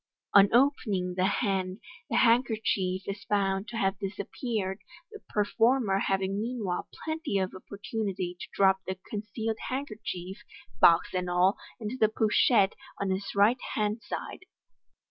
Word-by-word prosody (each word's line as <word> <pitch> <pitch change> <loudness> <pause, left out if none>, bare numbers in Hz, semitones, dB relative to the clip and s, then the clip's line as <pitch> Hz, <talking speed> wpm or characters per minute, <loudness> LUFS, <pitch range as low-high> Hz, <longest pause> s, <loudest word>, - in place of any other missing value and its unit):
On 200 0 +7
opening 220 -8 +2
the 185 0 +2
hand, 195 -2 -1 0.3
the - - -1
handkerchief 220 -6 +2
is 200 0 -5
found 195 0 0
to 230 - -6
have 195 -2 0
disappeared, 200 0 -3 0.3
the 425 - -9
performer 220 0 +2
having 195 +1 0
meanwhile 220 -6 -3 0.2
pienty 315 - -1
of 190 -1 -1
opportunity 195 -2 -4
to - - -7
drop 190 -1 +4
the 190 0 -3
con 210 - -2
cealed 220 +1 -4
handkerchief, 215 -8 -5 0.4
box 170 0 +6
and 180 -1 -1
all, 180 +3 +3 0.2
into 225 +3 -4
the 215 - +5
pochette 215 -1 +3 0.3
on 200 -1 -1
his 195 +2 -3
right 215 +5 +4
hand 210 +1 0
side. 365 - -6
200 Hz, 140 wpm, -29 LUFS, 190-225 Hz, 0.4 s, On